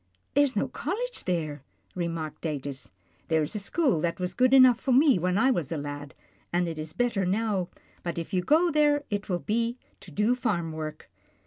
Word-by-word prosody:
" -, -, -45 dB
There's 285 Hz, -2 st, +3 dB
no 205 Hz, -, +1 dB
college 485 Hz, -, -4 dB
there," 155 Hz, -6 st, -2 dB, 0.3 s
remarked 165 Hz, -3 st, -4 dB
Datus. 140 Hz, -4 st, -5 dB, 0.2 s
" -, -, -37 dB
There's 160 Hz, -1 st, +1 dB
a 210 Hz, -, -2 dB
school 205 Hz, -, +1 dB
that 170 Hz, +3 st, -1 dB
was 180 Hz, 0 st, -2 dB
good 255 Hz, 0 st, +3 dB
enough 255 Hz, -2 st, +7 dB
for 270 Hz, -, -1 dB
me 270 Hz, -, +5 dB
when 180 Hz, +2 st, +1 dB
I 260 Hz, +5 st, +4 dB
was 170 Hz, -, -2 dB
a 165 Hz, -, -1 dB
lad, 145 Hz, -1 st, -6 dB, 0.4 s
and 175 Hz, 0 st, +1 dB
it 165 Hz, -2 st, -5 dB
is 155 Hz, 0 st, -5 dB
better 230 Hz, 0 st, 0 dB
now, 195 Hz, -1 st, 0 dB, 0.3 s
but 170 Hz, -1 st, -4 dB
if 170 Hz, +4 st, -5 dB
you 185 Hz, -, +2 dB
go 325 Hz, -, +3 dB
there, 295 Hz, -1 st, +3 dB
it 205 Hz, 0 st, -2 dB
will 180 Hz, -, +1 dB
be 230 Hz, +6 st, -1 dB, 0.2 s
to -, -, -13 dB
do 210 Hz, +9 st, +2 dB
farm 200 Hz, -10 st, -1 dB
work." 155 Hz, -1 st, -6 dB
185 Hz, 205 wpm, -27 LUFS, 160-250 Hz, 0.4 s, enough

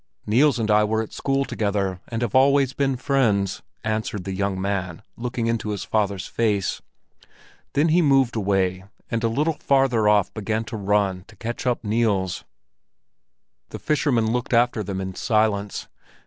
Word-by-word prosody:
"Niels 125 Hz, +5 st, +3 dB
and 110 Hz, -2 st, 0 dB
I 105 Hz, 0 st, +5 dB
were 110 Hz, +1 st, 0 dB
at 110 Hz, -, -11 dB
school 135 Hz, 0 st, 0 dB
together 100 Hz, -5 st, -2 dB
and 115 Hz, 0 st, -3 dB
have 115 Hz, -, -2 dB
always 135 Hz, 0 st, +4 dB
been 135 Hz, -1 st, 0 dB
friends," 115 Hz, -8 st, +1 dB, 0.2 s
answered 110 Hz, -2 st, -2 dB
the 95 Hz, -, -4 dB
young 100 Hz, 0 st, -1 dB
man, 95 Hz, -1 st, -3 dB
looking 120 Hz, -1 st, -3 dB
into 115 Hz, -2 st, -1 dB
his 105 Hz, -2 st, -3 dB
father's 100 Hz, -4 st, -1 dB
face. 105 Hz, -4 st, -1 dB, 0.9 s
Then 150 Hz, +4 st, +3 dB
he 170 Hz, +3 st, +4 dB
moved 135 Hz, -5 st, +3 dB
away, 95 Hz, -3 st, 0 dB, 0.3 s
and 115 Hz, 0 st, -1 dB
a -, -, +3 dB
little 150 Hz, +8 st, +1 dB
farther 130 Hz, -6 st, +3 dB
off 105 Hz, -2 st, +3 dB
began 110 Hz, +1 st, -2 dB
to 110 Hz, +1 st, -7 dB
run 100 Hz, -3 st, 0 dB
to 110 Hz, -, -16 dB
catch 120 Hz, +4 st, -5 dB
up 120 Hz, -1 st, 0 dB
Niels. 105 Hz, -4 st, 0 dB, 1.2 s
The -, -, -7 dB
fishermen 125 Hz, -7 st, +1 dB
looked 125 Hz, +1 st, 0 dB
after 120 Hz, -1 st, +2 dB
them 95 Hz, 0 st, -4 dB
in 95 Hz, 0 st, -4 dB
silence. 105 Hz, -1 st, 0 dB
110 Hz, 160 wpm, -23 LUFS, 100-125 Hz, 1.2 s, I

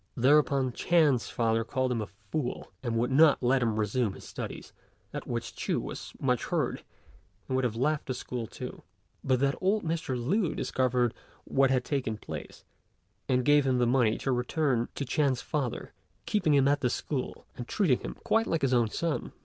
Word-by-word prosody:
Thereupon 135 Hz, 0 st, +4 dB
Ch'ên's 150 Hz, -4 st, +2 dB
father 115 Hz, -1 st, +1 dB
called 130 Hz, +3 st, -1 dB
him 115 Hz, -3 st, 0 dB
a 105 Hz, -, -4 dB
fool, 125 Hz, +6 st, -5 dB
and 120 Hz, -3 st, -2 dB
would 120 Hz, +3 st, 0 dB
not 150 Hz, 0 st, +5 dB
let 130 Hz, +2 st, +3 dB
him 110 Hz, -2 st, 0 dB
resume 105 Hz, 0 st, 0 dB
his -, -, -12 dB
studies; -, -, -7 dB, 0.4 s
at -, -, -5 dB
which -, -, -4 dB
Ch'u -, -, -1 dB
was -, -, -7 dB
much -, -, +1 dB
hurt, -, -, -1 dB, 0.7 s
and 130 Hz, -, -1 dB
would 130 Hz, -, +1 dB
have 120 Hz, -3 st, 0 dB
left 150 Hz, +5 st, 0 dB
the 130 Hz, -, -2 dB
school 120 Hz, -2 st, -5 dB
too, -, -, -8 dB, 0.4 s
but 130 Hz, -2 st, +2 dB
that 140 Hz, 0 st, +3 dB
old 200 Hz, +3 st, +2 dB
Mr. 160 Hz, -6 st, -2 dB
Lü 170 Hz, -, 0 dB
discovered 125 Hz, -2 st, +1 dB, 0.3 s
what 135 Hz, -1 st, +2 dB
had 130 Hz, -1 st, +1 dB
taken 130 Hz, -7 st, -1 dB
place, -, -, -8 dB, 0.7 s
and 125 Hz, -1 st, +2 dB
gave 145 Hz, -1 st, +5 dB
him 130 Hz, -1 st, +2 dB
the 125 Hz, -, +3 dB
money 120 Hz, -3 st, +3 dB
to 135 Hz, -, -1 dB
return 125 Hz, 0 st, 0 dB
to 140 Hz, -, -3 dB
Ch'ên's 135 Hz, -2 st, +1 dB
father, 140 Hz, -6 st, -3 dB, 0.3 s
keeping 160 Hz, -8 st, +2 dB
him 140 Hz, -, +5 dB
still 140 Hz, -, +5 dB
at 145 Hz, -, -2 dB
the 125 Hz, -, +2 dB
school, 130 Hz, +1 st, -4 dB
and 120 Hz, -, -7 dB
treating 165 Hz, -12 st, +2 dB
him -, -, -6 dB
quite 225 Hz, +1 st, +2 dB
like 165 Hz, -3 st, -1 dB
his 130 Hz, -1 st, +2 dB
own 120 Hz, -3 st, +3 dB
son. 165 Hz, +6 st, -2 dB
130 Hz, 190 wpm, -29 LUFS, 120-145 Hz, 0.7 s, not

